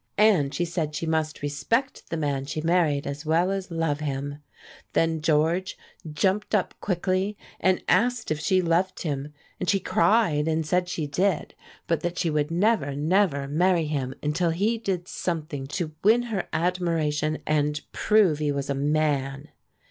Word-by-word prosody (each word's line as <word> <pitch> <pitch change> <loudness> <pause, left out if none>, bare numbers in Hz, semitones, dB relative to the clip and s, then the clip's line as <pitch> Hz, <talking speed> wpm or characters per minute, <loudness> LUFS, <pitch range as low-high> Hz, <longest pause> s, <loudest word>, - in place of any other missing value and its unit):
And 200 -10 +4
she 165 +4 -1
said 165 -3 -3
she 165 - -2
must 160 -2 -1
respect 230 - -1
the 165 - -2
man 140 -3 -1
she 150 - -4
married 160 -3 +2
as 140 +2 -5
well 165 +4 +2
as 195 -1 -3
love 165 -3 -1
him. 145 -1 -4 0.5
Then 165 -1 +1
George 165 +4 +1 0.3
jumped 190 +8 +1
up 200 - 0
quickly 190 +2 -1 0.2
and 185 -1 +2
asked 225 +3 +2
if 155 - 0
she 185 +4 +2
loved 175 +3 0
him, 145 -2 -3 0.3
and 180 - -1
she 195 - +3
cried 200 -7 +2
and 160 0 0
said 180 +3 +1
she 160 -3 -2
did, 180 +7 0 0.3
but 165 -2 0
that 175 0 -3
she 170 -3 0
would 150 0 0
never, 175 -5 +1
never 150 -2 +1
marry 170 +3 +2
him 140 -4 -2
until 160 +4 +1
he 205 +8 0
did 185 -5 -2
something 155 -5 -3
to 155 +2 -3
win 225 +4 +5
her 190 - -2
admiration 160 -3 0
and 150 -1 +1
prove 200 -8 +3
he 150 -1 0
was 140 0 -2
a - - +2
man. 145 -1 0
165 Hz, 165 wpm, -26 LUFS, 150-185 Hz, 0.5 s, win